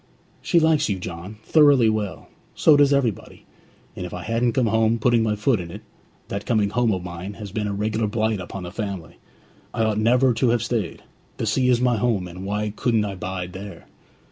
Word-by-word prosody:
'She 175 Hz, -, +3 dB
likes 160 Hz, -5 st, +2 dB
you, 100 Hz, -, 0 dB
John, 90 Hz, +3 st, -7 dB
thoroughly 145 Hz, -6 st, +5 dB
well; 110 Hz, -3 st, -2 dB, 0.3 s
so 155 Hz, -, +5 dB
does 145 Hz, -1 st, +5 dB
everybody; 130 Hz, -7 st, -1 dB, 0.5 s
and -, -, -5 dB
if -, -, -6 dB
I -, -, -6 dB
hadn't 115 Hz, +1 st, 0 dB
come 130 Hz, 0 st, +2 dB
home, 110 Hz, +1 st, +2 dB
putting 120 Hz, +1 st, +3 dB
my 110 Hz, -1 st, +1 dB
foot 105 Hz, +2 st, +1 dB
in 85 Hz, -1 st, -6 dB
it -, -, -9 dB, 0.5 s
That 100 Hz, 0 st, -4 dB
coming 105 Hz, -4 st, +1 dB
home 120 Hz, 0 st, +2 dB
of 95 Hz, -3 st, -2 dB
mine 90 Hz, +3 st, -6 dB
has 105 Hz, -2 st, -8 dB
been 105 Hz, 0 st, -2 dB
a 100 Hz, -, -2 dB
regular 110 Hz, +2 st, -1 dB
blight 110 Hz, 0 st, 0 dB
upon 90 Hz, +1 st, -7 dB
the 90 Hz, -, -7 dB
family! 100 Hz, -5 st, -6 dB, 0.6 s
I 115 Hz, -, +1 dB
ought 110 Hz, -1 st, +1 dB
never 125 Hz, +3 st, +3 dB
to 120 Hz, +2 st, +1 dB
have 120 Hz, -1 st, +1 dB
stayed. 110 Hz, -7 st, -3 dB, 0.3 s
The -, -, -2 dB
sea 125 Hz, +4 st, +1 dB
is 120 Hz, -2 st, +4 dB
my 125 Hz, -2 st, +2 dB
home, 105 Hz, -5 st, 0 dB
and 90 Hz, +2 st, -8 dB
why 105 Hz, +1 st, -2 dB
couldn't 115 Hz, -3 st, +1 dB
I 100 Hz, -, -4 dB
bide 90 Hz, -1 st, -5 dB
there?' 100 Hz, +1 st, -9 dB
110 Hz, 210 wpm, -23 LUFS, 100-120 Hz, 0.6 s, thoroughly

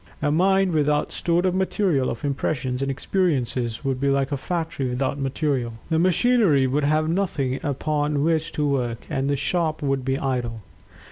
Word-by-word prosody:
A 145 Hz, -, 0 dB
mind 190 Hz, +3 st, +3 dB
without 150 Hz, -2 st, +1 dB
stored 175 Hz, +1 st, 0 dB
up 185 Hz, -, +2 dB
material 185 Hz, -7 st, +1 dB
of 115 Hz, -, -5 dB
impressions 135 Hz, -2 st, -2 dB
and 135 Hz, -, -1 dB
experiences 130 Hz, -, -1 dB
would 135 Hz, -1 st, -1 dB
be 140 Hz, -, +2 dB
like 135 Hz, 0 st, +1 dB
a -, -, +1 dB
factory 160 Hz, -2 st, -3 dB
without 135 Hz, +3 st, -1 dB
material. 135 Hz, -3 st, -1 dB, 0.2 s
The 160 Hz, -, +3 dB
machinery 185 Hz, -, +3 dB
would 140 Hz, +3 st, +1 dB
have 155 Hz, +1 st, +2 dB
nothing 155 Hz, -7 st, -1 dB
upon 145 Hz, 0 st, -1 dB
which 160 Hz, 0 st, +1 dB
to 150 Hz, -1 st, 0 dB
work, 125 Hz, -5 st, -1 dB
and 135 Hz, +1 st, 0 dB
the 145 Hz, -, +2 dB
shop 155 Hz, +2 st, -1 dB
would 135 Hz, -2 st, 0 dB
be 135 Hz, +1 st, 0 dB
idle. 120 Hz, -5 st, -2 dB
145 Hz, 175 wpm, -23 LUFS, 135-165 Hz, 0.2 s, mind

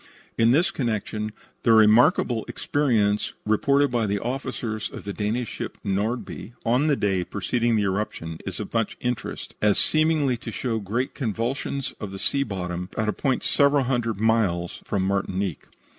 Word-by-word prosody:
In 115 Hz, 0 st, +4 dB
this 170 Hz, +10 st, +4 dB
connection 110 Hz, -, -2 dB, 0.3 s
the 115 Hz, -, +4 dB
remarkable 110 Hz, +1 st, +5 dB
experience 110 Hz, -8 st, +1 dB
reported 140 Hz, +6 st, +3 dB
by 115 Hz, -3 st, +1 dB
the 100 Hz, +1 st, 0 dB
officers 115 Hz, -2 st, -3 dB
of -, -, -9 dB
the 100 Hz, -, -4 dB
Danish 110 Hz, +3 st, -1 dB
steamship -, -, -5 dB
Nordby, 110 Hz, +4 st, -2 dB
on 125 Hz, +6 st, +3 dB
the 145 Hz, -, +4 dB
day 95 Hz, -6 st, +1 dB
preceding 115 Hz, +5 st, 0 dB
the 105 Hz, -, +2 dB
eruption, 95 Hz, -5 st, -2 dB
is -, -, -5 dB
of -, -, -6 dB
much 115 Hz, -2 st, 0 dB
interest, 125 Hz, -3 st, -4 dB
as 105 Hz, -1 st, +4 dB
seeming 155 Hz, -4 st, +2 dB
to 115 Hz, 0 st, -7 dB
show 115 Hz, 0 st, -2 dB
great 115 Hz, +6 st, -2 dB
convulsions 130 Hz, +2 st, -2 dB
of 105 Hz, -, -5 dB
the 100 Hz, -, -6 dB
sea 140 Hz, +7 st, +1 dB
bottom 90 Hz, -6 st, -3 dB
at 110 Hz, -1 st, +1 dB
a -, -, 0 dB
point 135 Hz, -3 st, 0 dB
several 140 Hz, -1 st, +4 dB
hundred 120 Hz, -5 st, -1 dB
miles 105 Hz, -6 st, +1 dB
from 100 Hz, -2 st, 0 dB
Martinique. 95 Hz, -3 st, -1 dB
110 Hz, 160 wpm, -25 LUFS, 100-125 Hz, 0.3 s, remarkable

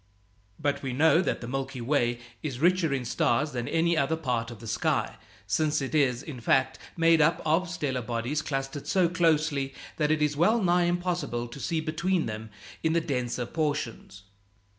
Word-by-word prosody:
But 145 Hz, -1 st, -1 dB
we 130 Hz, -2 st, -3 dB
know 160 Hz, +5 st, +5 dB
that -, -, -1 dB
the 120 Hz, -, -6 dB
Milky 135 Hz, 0 st, -3 dB
Way 120 Hz, -1 st, +1 dB, 0.2 s
is 140 Hz, -6 st, -4 dB
richer 170 Hz, +1 st, +3 dB
in 135 Hz, -3 st, -1 dB
stars 135 Hz, +5 st, +1 dB
than 120 Hz, -2 st, -3 dB
any 170 Hz, +1 st, +2 dB
other 160 Hz, +1 st, +1 dB
part 125 Hz, -7 st, -2 dB
of 120 Hz, -, -9 dB
the 115 Hz, -, -10 dB
sky, 110 Hz, -, -1 dB, 0.3 s
since 150 Hz, +10 st, +1 dB
it 135 Hz, 0 st, -4 dB
is, 135 Hz, -4 st, +2 dB
in 140 Hz, -6 st, -7 dB
fact, 130 Hz, +3 st, +1 dB, 0.2 s
made 165 Hz, -1 st, +5 dB
up 160 Hz, +2 st, +3 dB
of 165 Hz, +4 st, +2 dB
stellar 145 Hz, -8 st, -2 dB
bodies 120 Hz, +6 st, -2 dB
clustered 135 Hz, 0 st, -4 dB
so 180 Hz, +3 st, +3 dB
closely 155 Hz, -5 st, +1 dB, 0.2 s
that 150 Hz, -1 st, +1 dB
it 155 Hz, -1 st, +2 dB
is 150 Hz, -1 st, +1 dB
wellnigh 180 Hz, 0 st, +3 dB
impossible 175 Hz, -9 st, -1 dB
to 130 Hz, -, -9 dB
see 160 Hz, +5 st, -1 dB
between 170 Hz, +3 st, 0 dB
them 110 Hz, 0 st, -5 dB, 0.3 s
in 160 Hz, 0 st, +1 dB
the 170 Hz, -, +3 dB
denser 125 Hz, -5 st, -2 dB
portions. 145 Hz, -, -3 dB
145 Hz, 180 wpm, -28 LUFS, 125-165 Hz, 0.3 s, know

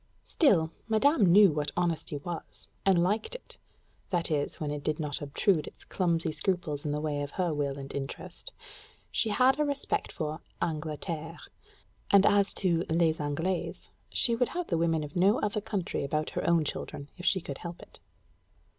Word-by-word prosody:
Still, 170 Hz, -, +3 dB, 0.2 s
madame 220 Hz, -, +4 dB
knew 200 Hz, 0 st, +8 dB
what 150 Hz, -1 st, -1 dB
honesty 170 Hz, -4 st, 0 dB
was, 170 Hz, +3 st, -7 dB, 0.2 s
and 180 Hz, -3 st, +5 dB
liked 215 Hz, -, 0 dB
it -, -, -8 dB, 0.5 s
that 175 Hz, -3 st, 0 dB
is, 145 Hz, -2 st, -1 dB
when 150 Hz, -2 st, -2 dB
it 145 Hz, -1 st, -4 dB
did 155 Hz, 0 st, -1 dB
not 150 Hz, -2 st, -3 dB
obtrude 155 Hz, +3 st, +1 dB
its -, -, -12 dB
clumsy 170 Hz, -3 st, 0 dB
scruples 155 Hz, -2 st, -1 dB
in 150 Hz, -, -2 dB
the 150 Hz, -, -1 dB
way 150 Hz, -1 st, -2 dB
of 145 Hz, -, -3 dB
her 180 Hz, -4 st, 0 dB
will 140 Hz, -2 st, -1 dB
and 135 Hz, 0 st, -7 dB
interest. 140 Hz, 0 st, -6 dB, 0.6 s
She 225 Hz, -, +1 dB
had 255 Hz, +6 st, +4 dB
a -, -, +4 dB
respect 285 Hz, -1 st, -1 dB
for 155 Hz, +1 st, -4 dB, 0.2 s
"Angleterre"; 160 Hz, +1 st, -3 dB, 0.7 s
and 200 Hz, 0 st, +6 dB
as 200 Hz, -1 st, +4 dB
to 170 Hz, -3 st, +2 dB
"les 165 Hz, -1 st, +2 dB
Anglaises," 160 Hz, +5 st, -2 dB, 0.2 s
she 235 Hz, -, +3 dB
would 245 Hz, +1 st, +2 dB
have 355 Hz, -, -1 dB
the 170 Hz, -, +1 dB
women 165 Hz, -2 st, +1 dB
of 145 Hz, 0 st, -8 dB
no 190 Hz, +4 st, +4 dB
other 210 Hz, 0 st, -1 dB
country 200 Hz, -8 st, -2 dB
about 155 Hz, +2 st, -1 dB
her -, -, -1 dB
own 165 Hz, -2 st, +3 dB
children, 140 Hz, 0 st, -5 dB
if 180 Hz, -, -4 dB
she 190 Hz, -, +4 dB
could 140 Hz, -5 st, -7 dB
help 170 Hz, 0 st, -7 dB
it. -, -, -14 dB
165 Hz, 180 wpm, -29 LUFS, 150-195 Hz, 0.7 s, knew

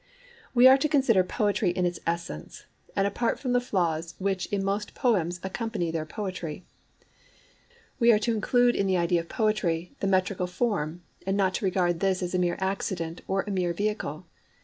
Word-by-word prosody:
We 245 Hz, +1 st, +7 dB
are 265 Hz, +1 st, +7 dB
to 305 Hz, -, +1 dB
consider 260 Hz, -10 st, +4 dB
poetry 205 Hz, +1 st, 0 dB
in 180 Hz, +1 st, 0 dB
its 175 Hz, -1 st, -2 dB
essence, 165 Hz, -, -4 dB, 0.3 s
and 195 Hz, -, +2 dB
apart 215 Hz, +4 st, 0 dB
from 255 Hz, -3 st, -2 dB
the 245 Hz, -, +3 dB
flaws 170 Hz, -7 st, -1 dB
which 190 Hz, -1 st, -1 dB
in 200 Hz, -1 st, -1 dB
most 200 Hz, +1 st, -2 dB
poems 180 Hz, -8 st, +1 dB
accompany 190 Hz, -3 st, -2 dB
their 160 Hz, -1 st, -3 dB
poetry. 185 Hz, -3 st, -5 dB, 1.3 s
We 235 Hz, -1 st, +6 dB
are 215 Hz, -, +5 dB
to 230 Hz, +2 st, 0 dB
include 245 Hz, +3 st, +3 dB
in 195 Hz, -, +1 dB
the 190 Hz, -1 st, +2 dB
idea 170 Hz, 0 st, +2 dB
of 165 Hz, -, -7 dB
poetry 180 Hz, -6 st, 0 dB
the 195 Hz, -, -1 dB
metrical 185 Hz, -1 st, +1 dB
form, 180 Hz, -4 st, -2 dB, 0.2 s
and 195 Hz, +1 st, +1 dB
not 190 Hz, -1 st, +2 dB
to 210 Hz, -, -2 dB
regard 175 Hz, -2 st, +1 dB
this 190 Hz, 0 st, +1 dB
as 180 Hz, -, -3 dB
a 180 Hz, -, +1 dB
mere 175 Hz, -1 st, +1 dB
accident 190 Hz, -3 st, -2 dB
or 195 Hz, 0 st, 0 dB
a 205 Hz, -, -5 dB
mere 180 Hz, -3 st, 0 dB
vehicle. 210 Hz, +4 st, -3 dB
190 Hz, 185 wpm, -27 LUFS, 175-210 Hz, 1.3 s, We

